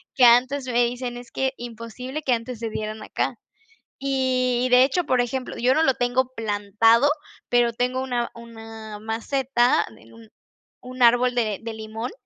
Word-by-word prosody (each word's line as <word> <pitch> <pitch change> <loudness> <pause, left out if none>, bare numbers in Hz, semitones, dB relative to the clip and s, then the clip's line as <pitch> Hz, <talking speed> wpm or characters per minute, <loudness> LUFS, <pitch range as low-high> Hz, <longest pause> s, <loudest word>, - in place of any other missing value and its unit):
que 255 - +6
antes 255 +3 +4
me 240 -1 +2
dicen: 245 0 -4
"Es 245 -1 -11
que 265 +1 -1
imposible 240 +4 -7
que 255 - +2
antes 230 0 -4
se 230 -1 -3
dieran 215 0 -5
acá". - - -2 0.7
Y 255 -2 +1
de 250 +1 +8
hecho, 315 +7 +1
por 255 -4 +2
ejemplo, 250 +1 -3
yo 255 +2 +2
no 320 - +3
lo 265 - +3
tengo 250 +1 0
plantado, 225 +4 +3 0.4
pero 240 -1 +3
tengo 250 +2 -1
una 245 -2 -2
una 225 -2 -10
maceta 240 +3 +1
en 115 +1 -19
un 115 -1 -15 0.5
un 255 0 -9
árbol 245 +1 +5
de 220 -4 -1
de 230 -1 -5
limón, 220 +4 -6
245 Hz, 165 wpm, -23 LUFS, 225-255 Hz, 0.7 s, de